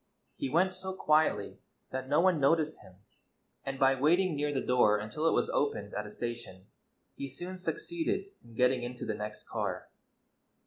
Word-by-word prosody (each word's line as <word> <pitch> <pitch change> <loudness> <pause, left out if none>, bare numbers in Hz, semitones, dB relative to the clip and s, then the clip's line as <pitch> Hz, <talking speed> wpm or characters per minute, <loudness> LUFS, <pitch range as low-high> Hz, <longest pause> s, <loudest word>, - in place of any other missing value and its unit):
He 135 - -3
went 185 +6 +3
so 190 +1 -3
quietly 155 - +2 0.3
that 130 0 -4
no 150 +3 +4
one 180 -3 +4
noticed 155 +2 +2
him, 90 - -16 0.7
and 135 0 -4
by 135 0 +5
waiting 165 +6 +3
near 145 0 0
the 140 - 0
door 120 -5 +4
until 110 +10 -2
it - - +4
was - - +2
oj)ened 105 -8 -1
at 105 0 -3
a - - -10
station 115 -6 -6 0.5
he 140 - -6
soon 175 +7 -6
succeeded 345 - -2
in 115 -1 -16
getting 125 +1 +3
into 120 0 -5
the 110 - -1
next 105 0 -6
car. - - -3
135 Hz, 175 wpm, -31 LUFS, 120-170 Hz, 0.7 s, by